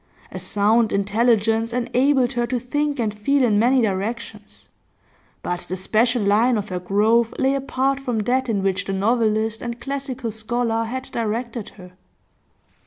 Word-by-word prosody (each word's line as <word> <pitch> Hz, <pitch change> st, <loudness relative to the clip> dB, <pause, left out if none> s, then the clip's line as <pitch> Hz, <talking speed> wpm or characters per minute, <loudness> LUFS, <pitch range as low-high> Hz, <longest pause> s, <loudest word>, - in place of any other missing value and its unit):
A -, -, -6 dB
sound 215 Hz, +2 st, +2 dB
intelligence 225 Hz, +2 st, +1 dB
enabled 250 Hz, +1 st, +1 dB
her 240 Hz, 0 st, -1 dB
to 250 Hz, +1 st, -1 dB
think 290 Hz, +4 st, -2 dB
and 215 Hz, -3 st, 0 dB
feel 265 Hz, +7 st, +1 dB
in 215 Hz, -4 st, +3 dB
many 250 Hz, +2 st, +3 dB
directions, 210 Hz, +3 st, -4 dB, 0.8 s
but 175 Hz, 0 st, -2 dB
the 185 Hz, -, -2 dB
special 225 Hz, +5 st, +1 dB
line 220 Hz, +4 st, +3 dB
of 210 Hz, 0 st, -4 dB
her 180 Hz, -1 st, -3 dB
growth 215 Hz, +5 st, +2 dB
lay 265 Hz, +1 st, +2 dB
apart 275 Hz, 0 st, -1 dB
from 250 Hz, -4 st, -3 dB
that 255 Hz, +4 st, 0 dB
in 200 Hz, -4 st, 0 dB
which 195 Hz, 0 st, 0 dB
the 195 Hz, -, -3 dB
novelist 220 Hz, +1 st, +1 dB
and 235 Hz, 0 st, -5 dB
classical 265 Hz, -2 st, -4 dB
scholar 225 Hz, +1 st, -1 dB
had 260 Hz, +3 st, -4 dB
directed 230 Hz, 0 st, -3 dB
her. 180 Hz, -2 st, -12 dB
230 Hz, 155 wpm, -22 LUFS, 210-250 Hz, 0.8 s, in